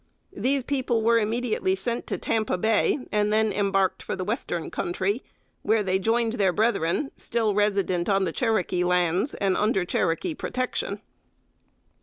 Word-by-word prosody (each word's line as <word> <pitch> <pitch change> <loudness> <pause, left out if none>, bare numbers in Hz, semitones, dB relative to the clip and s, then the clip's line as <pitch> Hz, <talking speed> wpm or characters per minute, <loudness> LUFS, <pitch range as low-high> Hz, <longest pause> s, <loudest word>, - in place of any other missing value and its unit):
These 275 -4 +1
people 250 -4 0
were 230 +1 +4
immediately 220 -3 0
sent 235 +5 -3
to - - -2
Tampa 215 -4 -1
Bay, 220 +6 +1
and 210 0 +1
then 220 0 +2
embarked 195 -2 +1
for - - -4
the 185 - -4
Western 180 -5 -3
Country, 190 +7 -1 0.4
where 220 0 +2
they 190 -1 +1
joined 225 +3 +1
their 200 -6 +2
brethren, 220 - 0
still 225 -3 0
resident 195 -4 +1
on 195 -1 +3
the 175 - -1
Cherokee 215 -6 0
lands, 180 - +1
and 195 -2 +1
under 205 -3 +1
Cherokee 175 - 0
protection. 255 -4 -3
210 Hz, 150 wpm, -25 LUFS, 190-230 Hz, 0.4 s, were